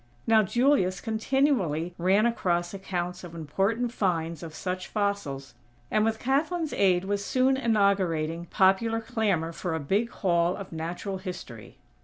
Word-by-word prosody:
Now 225 Hz, -1 st, +5 dB
Julius 215 Hz, -3 st, +2 dB
continually 220 Hz, -, 0 dB
ran 190 Hz, +5 st, +3 dB
across 175 Hz, -7 st, 0 dB
accounts 180 Hz, -2 st, -4 dB
of 170 Hz, -2 st, -9 dB
important 195 Hz, +10 st, -1 dB
"finds" 170 Hz, -7 st, -1 dB
of 160 Hz, -2 st, -8 dB
such 185 Hz, 0 st, -4 dB
fossils, 200 Hz, -10 st, -2 dB, 0.4 s
and 215 Hz, -, +3 dB
with 225 Hz, 0 st, +1 dB
Kathlyn's 305 Hz, +6 st, 0 dB
aid 185 Hz, -2 st, +3 dB
was 200 Hz, 0 st, -1 dB
soon 260 Hz, +4 st, +2 dB
inaugurating 190 Hz, -, +1 dB
popular 200 Hz, +6 st, +3 dB
clamor 215 Hz, -8 st, -1 dB
for 170 Hz, 0 st, -3 dB
a -, -, -2 dB
big 200 Hz, +11 st, 0 dB
Hall 175 Hz, -3 st, +1 dB
of 195 Hz, -2 st, -8 dB
Natural 175 Hz, +4 st, -4 dB
History. 175 Hz, -, -8 dB
190 Hz, 140 wpm, -27 LUFS, 170-225 Hz, 0.4 s, Now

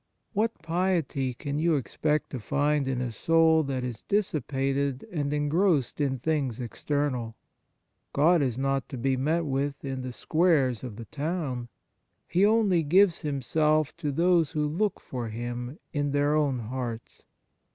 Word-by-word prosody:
What 220 Hz, -1 st, -1 dB
piety 165 Hz, -7 st, 0 dB
can 145 Hz, +2 st, -3 dB
you 165 Hz, 0 st, +3 dB
expect 150 Hz, +2 st, -1 dB
to 130 Hz, -, -4 dB
find 145 Hz, +4 st, +1 dB
in 130 Hz, -2 st, -1 dB
a 125 Hz, -2 st, -2 dB
soul 160 Hz, +6 st, +4 dB
that 130 Hz, -2 st, -2 dB
is 120 Hz, -3 st, -5 dB
dissipated 140 Hz, -, -1 dB
and 145 Hz, -4 st, -1 dB
en 145 Hz, 0 st, 0 dB
grossed 155 Hz, -5 st, +2 dB
in 135 Hz, -2 st, 0 dB
things 135 Hz, -3 st, -1 dB
external? 125 Hz, -1 st, -2 dB, 0.8 s
God 165 Hz, +4 st, +4 dB
is 125 Hz, -4 st, 0 dB
not 135 Hz, 0 st, -1 dB
to 135 Hz, -, -6 dB
be 130 Hz, +2 st, +1 dB
met 155 Hz, +6 st, 0 dB
with 140 Hz, 0 st, -2 dB
in 135 Hz, -1 st, -3 dB
the 130 Hz, 0 st, -5 dB
squares 145 Hz, -4 st, +2 dB
of 120 Hz, -5 st, -6 dB
the 115 Hz, +1 st, -8 dB
town; 145 Hz, -5 st, -3 dB, 0.6 s
He 185 Hz, -, +2 dB
only 205 Hz, -5 st, +4 dB
gives 175 Hz, +3 st, +4 dB
Himself 150 Hz, +2 st, +1 dB
to 150 Hz, -4 st, -2 dB
those 170 Hz, +1 st, +2 dB
who 150 Hz, -1 st, 0 dB
look 195 Hz, +7 st, -1 dB
for 120 Hz, -3 st, -5 dB
Him 120 Hz, +4 st, -5 dB, 0.2 s
in 145 Hz, -2 st, -1 dB
their 145 Hz, +1 st, +2 dB
own 145 Hz, -4 st, +2 dB
hearts. 120 Hz, 0 st, -5 dB
145 Hz, 155 wpm, -27 LUFS, 130-160 Hz, 0.8 s, soul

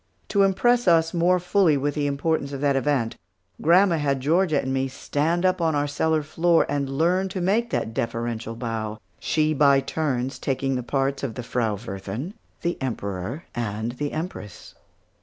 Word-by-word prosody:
To 200 Hz, -, +2 dB
impress 240 Hz, +4 st, +3 dB
us 165 Hz, -1 st, +4 dB
more 180 Hz, +1 st, +3 dB
fully 180 Hz, -3 st, +3 dB
with 145 Hz, +1 st, -1 dB
the 145 Hz, -1 st, -1 dB
importance 140 Hz, 0 st, -1 dB
of 135 Hz, -, -5 dB
that 140 Hz, -1 st, +2 dB
event, 135 Hz, -4 st, 0 dB, 0.4 s
grandma 175 Hz, +2 st, +5 dB
had 140 Hz, -3 st, 0 dB
Georgia 155 Hz, +2 st, +2 dB
and 130 Hz, -, -2 dB
me 135 Hz, 0 st, 0 dB
stand 155 Hz, +6 st, -1 dB
up 185 Hz, -1 st, +2 dB
on 160 Hz, -2 st, +2 dB
our 145 Hz, 0 st, +1 dB
cellar 155 Hz, +2 st, 0 dB
floor 165 Hz, +3 st, +2 dB
and 140 Hz, -1 st, -1 dB
learn 180 Hz, +4 st, +2 dB
to 185 Hz, -, -4 dB
make 210 Hz, +7 st, +1 dB
that 115 Hz, -, -2 dB
deferential 115 Hz, 0 st, -3 dB
bow, 110 Hz, -2 st, -4 dB, 0.2 s
she 155 Hz, -1 st, +1 dB
by 140 Hz, -2 st, +5 dB
turns, 135 Hz, -3 st, -2 dB
taking 135 Hz, 0 st, -1 dB
the 125 Hz, -, -1 dB
parts 135 Hz, +2 st, -1 dB
of 130 Hz, -5 st, -4 dB
the 125 Hz, -, -5 dB
Frau 115 Hz, -3 st, -1 dB
Wirthin, 100 Hz, -, -6 dB, 0.3 s
the 170 Hz, -3 st, -2 dB
Emperor, 110 Hz, -, -4 dB
and 110 Hz, 0 st, -3 dB
the 145 Hz, +4 st, -4 dB
Empress. 155 Hz, -, -6 dB
145 Hz, 175 wpm, -24 LUFS, 125-170 Hz, 0.4 s, grandma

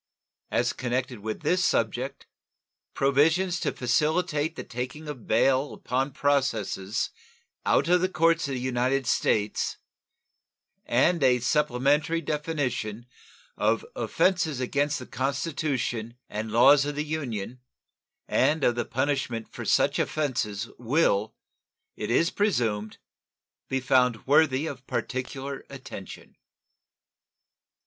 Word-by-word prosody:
As -, -, +1 dB
connected 125 Hz, -1 st, -2 dB
with 110 Hz, +1 st, -5 dB
this 180 Hz, +1 st, +2 dB
subject, -, -, 0 dB, 0.7 s
provisions 160 Hz, +7 st, +3 dB
to -, -, 0 dB
facilitate 155 Hz, +4 st, 0 dB
the -, -, -6 dB
taking 130 Hz, +6 st, -6 dB
of 140 Hz, -6 st, -7 dB
bail 130 Hz, +5 st, +2 dB
upon 130 Hz, +3 st, -1 dB
processes 115 Hz, -8 st, 0 dB, 0.6 s
out 140 Hz, -, +3 dB
of 180 Hz, +1 st, +4 dB
the 185 Hz, -, +1 dB
courts 165 Hz, -2 st, +2 dB
of 135 Hz, -, -3 dB
the -, -, -3 dB
United 130 Hz, +1 st, 0 dB
States 105 Hz, -3 st, 0 dB, 1.1 s
and 160 Hz, +8 st, +3 dB
a 130 Hz, -2 st, +5 dB
supplementary 145 Hz, +4 st, +1 dB
definition 145 Hz, -8 st, -2 dB, 0.5 s
of -, -, +1 dB
offenses 165 Hz, -7 st, +1 dB
against 145 Hz, +3 st, 0 dB
the 125 Hz, -, -7 dB
Constitution 135 Hz, -4 st, -2 dB
and 110 Hz, +1 st, -4 dB
laws 135 Hz, +5 st, +6 dB
of 145 Hz, 0 st, -3 dB
the 150 Hz, +1 st, -2 dB
Union 125 Hz, -7 st, -4 dB, 0.7 s
and 150 Hz, +3 st, +2 dB
of 120 Hz, -, +4 dB
the 120 Hz, 0 st, -2 dB
punishment 130 Hz, -3 st, -2 dB
for -, -, -6 dB
such -, -, +3 dB
offenses 115 Hz, -8 st, -1 dB
will, 115 Hz, -5 st, +1 dB, 0.6 s
it 105 Hz, -, -5 dB
is 165 Hz, +8 st, +3 dB
presumed, 115 Hz, -, 0 dB, 0.7 s
be 135 Hz, -, 0 dB
found 125 Hz, -3 st, +2 dB
worthy 145 Hz, 0 st, +4 dB
of 135 Hz, -4 st, -7 dB
particular 135 Hz, +1 st, -4 dB
attention. 130 Hz, -8 st, -10 dB
135 Hz, 115 wpm, -27 LUFS, 120-150 Hz, 1.1 s, laws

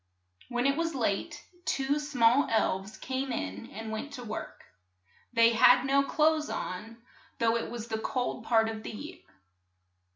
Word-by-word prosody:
When 245 Hz, 0 st, -1 dB
it 275 Hz, +1 st, +2 dB
was 330 Hz, -2 st, -1 dB
late, 210 Hz, -6 st, -2 dB, 0.2 s
two 275 Hz, 0 st, 0 dB
small 275 Hz, -3 st, +3 dB
elves 210 Hz, -2 st, 0 dB
came 265 Hz, +1 st, -3 dB
in 95 Hz, -, -4 dB
and 220 Hz, +1 st, -7 dB
went 250 Hz, +7 st, -5 dB
to 250 Hz, -3 st, -7 dB
work. 215 Hz, -2 st, -7 dB, 0.7 s
They 230 Hz, -1 st, +5 dB
had 245 Hz, +2 st, +6 dB
no 275 Hz, +1 st, +4 dB
clothes 310 Hz, +2 st, +2 dB
on, 215 Hz, +5 st, -5 dB, 0.4 s
though 230 Hz, 0 st, +2 dB
it 230 Hz, -, -2 dB
was 235 Hz, -1 st, -6 dB
the 220 Hz, -1 st, -2 dB
cold 250 Hz, +2 st, -2 dB
part 225 Hz, -2 st, +3 dB
of 220 Hz, -1 st, -4 dB
the -, -, -7 dB
year. 290 Hz, +9 st, -8 dB
240 Hz, 160 wpm, -29 LUFS, 220-275 Hz, 0.7 s, had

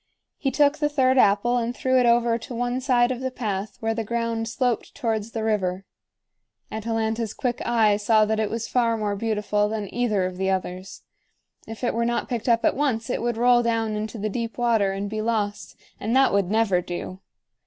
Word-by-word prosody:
He 275 Hz, -, 0 dB
took 290 Hz, +2 st, +2 dB
the 295 Hz, -1 st, +1 dB
third 260 Hz, -2 st, +3 dB
apple 210 Hz, +3 st, +3 dB
and 240 Hz, +1 st, -3 dB
threw 260 Hz, 0 st, +2 dB
it 245 Hz, -, +3 dB
over 235 Hz, 0 st, +3 dB
to 235 Hz, +2 st, -8 dB
one 245 Hz, +2 st, -1 dB
side 250 Hz, -2 st, +3 dB
of 250 Hz, -, -3 dB
the 260 Hz, 0 st, -2 dB
path 210 Hz, -5 st, -4 dB
where 225 Hz, 0 st, 0 dB
the 225 Hz, 0 st, -2 dB
ground 230 Hz, 0 st, -2 dB
sloped 240 Hz, 0 st, -1 dB
towards 225 Hz, -5 st, -2 dB
the 225 Hz, -1 st, -4 dB
river. 195 Hz, -3 st, -1 dB, 0.9 s
Atalanta's 220 Hz, 0 st, -2 dB
quick 245 Hz, -2 st, -2 dB
eye 220 Hz, -3 st, +3 dB
saw 215 Hz, +1 st, +3 dB
that 220 Hz, +1 st, -1 dB
it 215 Hz, -2 st, 0 dB
was 230 Hz, 0 st, -3 dB
far 235 Hz, -2 st, +1 dB
more 210 Hz, -2 st, -1 dB
beautiful 210 Hz, -1 st, 0 dB
than 210 Hz, -3 st, -4 dB
either 215 Hz, -6 st, +1 dB
of 185 Hz, 0 st, -5 dB
the 190 Hz, 0 st, 0 dB
others. 185 Hz, 0 st, -4 dB, 0.6 s
If 225 Hz, +2 st, -9 dB
it 240 Hz, -, +1 dB
were 235 Hz, -, 0 dB
not 235 Hz, 0 st, -1 dB
picked 240 Hz, 0 st, -2 dB
up 230 Hz, -1 st, +3 dB
at -, -, +3 dB
once 255 Hz, -6 st, -1 dB
it -, -, -2 dB
would 240 Hz, -1 st, -1 dB
roll 240 Hz, 0 st, +5 dB
down 225 Hz, -2 st, 0 dB
into 215 Hz, +2 st, -4 dB
the 210 Hz, 0 st, -2 dB
deep 230 Hz, +2 st, -4 dB
water 230 Hz, -5 st, +2 dB
and 195 Hz, +1 st, -3 dB
be 215 Hz, +1 st, -3 dB
lost, 215 Hz, -2 st, -2 dB, 0.2 s
and 225 Hz, +4 st, -1 dB
that 270 Hz, -4 st, +4 dB
would 200 Hz, -3 st, +1 dB
never 210 Hz, -4 st, +2 dB
do. 175 Hz, +1 st, -6 dB
225 Hz, 205 wpm, -24 LUFS, 210-240 Hz, 0.9 s, roll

